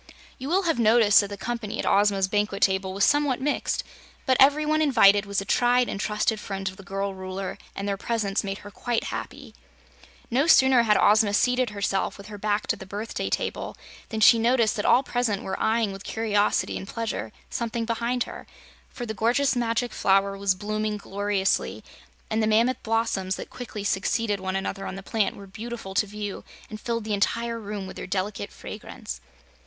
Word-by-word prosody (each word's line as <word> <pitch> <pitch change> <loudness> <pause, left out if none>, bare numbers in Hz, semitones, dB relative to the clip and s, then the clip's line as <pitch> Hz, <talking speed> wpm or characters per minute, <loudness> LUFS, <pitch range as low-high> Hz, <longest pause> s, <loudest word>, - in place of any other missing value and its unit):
You 265 +2 -5
will 380 +4 +2
have 325 -8 +1
noticed 220 -2 +6
that 200 - -4
the 200 0 -7
company 230 -1 -4
at - - -2
Ozma's 200 -1 +3
banquet 205 0 0
table 190 -1 +2
was 195 +2 0
somewhat 290 -3 +2
mixed, 285 +2 -1 0.4
but 260 - +3
every 290 +3 +5
one 310 +1 +2
invited 205 -8 +5
was 200 -1 0
a - - -7
tried 245 +3 +3
and 195 - -4
trusted 210 +1 0
friend 195 -1 -5
of 190 0 -4
the - - -10
girl 195 +1 -3
Ruler, 190 0 -5 0.2
and 200 - -4
their 200 -1 -1
presence 210 -2 -1
made 195 -1 -3
her 205 - -9
quite 240 +3 -2
happy. - - -7 0.8
No 270 +6 +2
sooner 265 -5 +6
had 215 -2 +3
Ozma 210 -1 +4
seated 250 +1 +2
herself, 200 -2 -1
with 200 0 -11
her 205 -1 -8
back 210 0 0
to - - 0
the 190 - -11
birthday 205 +4 -4
table, - - -3 0.3
than 220 -2 -3
she 230 +1 +7
noticed 235 -1 +3
that 205 - -2
all 255 - +5
present 245 -6 -1
were 190 - -4
eyeing 220 -2 +1
with 195 0 -8
curiosity 210 -2 0
and 195 - -8
pleasure 225 - -4 0.2
something 230 -1 -2
behind 235 +2 0
her, - - -10 0.4
for 245 - -6
the 220 - -4
gorgeous 245 +6 +2
Magic 235 0 0
Flower 195 0 +2
was 195 -1 +1
blooming 215 +2 -2
gloriously 200 -1 -1 0.4
and 220 0 0
the 215 - +2
mammoth 230 +4 +2
blossoms 220 -4 0
that - - -8
quickly 220 -4 -7
succeeded 205 +2 0
one 190 0 -3
another 195 0 -3
on - - -5
the 195 - -8
plant 210 -1 0
were 200 - -10
beautiful 215 0 -7
to 210 - +2
view 205 0 -6 0.3
and 215 - -7
filled 230 -3 -2
the 215 0 -2
entire 230 +3 0
room 205 -2 -5
with 190 - -9
their - - -6
delicate 190 +2 -3
fragrance. - - -8
210 Hz, 195 wpm, -25 LUFS, 195-235 Hz, 0.8 s, she